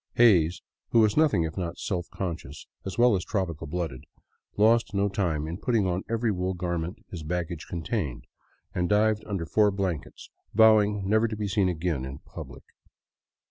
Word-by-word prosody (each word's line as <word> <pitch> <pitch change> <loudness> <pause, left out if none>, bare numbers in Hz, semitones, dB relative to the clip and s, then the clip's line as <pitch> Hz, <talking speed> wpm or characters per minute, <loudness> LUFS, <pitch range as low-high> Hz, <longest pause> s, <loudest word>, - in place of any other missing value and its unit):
Hays, 90 -8 +4 0.3
who 115 - +4
was 105 -2 +3
nothing 150 - +3
if 80 -1 -4
not 85 -2 -3
self 90 -3 -3
conscious, 80 -6 -5 0.2
as 95 - -5
well 120 -2 +5
as 90 - -1
tropical 85 -7 -3
blooded, 80 -5 -4 0.5
lost 110 +1 +3
no 100 +1 +2
time 85 -7 -1
in 85 +4 -5
putting 115 -3 +1
on 90 0 0
every 115 0 +1
wool 95 -1 -2
garment 85 0 -3
his 85 - -6
baggage 85 +1 -4
contained 85 - -3 0.5
and 90 -1 0
dived 105 +1 +3
under 95 -5 -2
four 105 +5 +3
blankets 95 -6 -4 0.2
vowing 105 -2 +5
never 110 +3 +3
to 110 - -4
be 105 -1 -3
seen 95 -1 +2
again 80 -5 -1
in 65 +1 -6
public. - - -10
95 Hz, 170 wpm, -27 LUFS, 85-105 Hz, 0.5 s, well